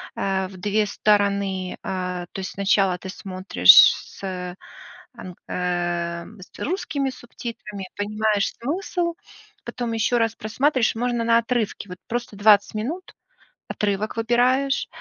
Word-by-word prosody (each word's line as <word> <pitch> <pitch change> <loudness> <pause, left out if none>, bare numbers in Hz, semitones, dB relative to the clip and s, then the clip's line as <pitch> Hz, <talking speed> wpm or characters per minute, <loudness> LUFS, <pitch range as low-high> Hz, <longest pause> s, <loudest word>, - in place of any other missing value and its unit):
а, 190 -1 -1
в 185 0 -12
2 210 +3 +1
стороны. 200 -3 0
А, 180 -1 -3
то - - -6
есть, 185 - -5
сначала 195 -2 +2
ты 190 +1 -9
смотришь 185 - +5 0.2
с, - - -13
э, 180 -1 -5 0.6
ам, 180 -1 -9
э, 175 -1 -2 0.2
с - - -14
русскими 295 -5 -2
субтитрами, 225 -5 -8
понимаешь 210 0 0
смысл, 340 +4 -2 0.5
потом 240 -1 -4
еще 230 +2 +1
раз 225 -1 +1
просматриваешь, 240 +2 +1
и - - -5
можно 240 -1 0
на 230 0 +4
отрывке, 230 -4 -2
вот 180 - -8
просто 235 -3 -4
20 205 0 +4
минут 305 +13 -5 0.5
отрывок 210 +2 -2
выбираешь, 250 +4 +2
210 Hz, 130 wpm, -23 LUFS, 190-240 Hz, 0.6 s, смотришь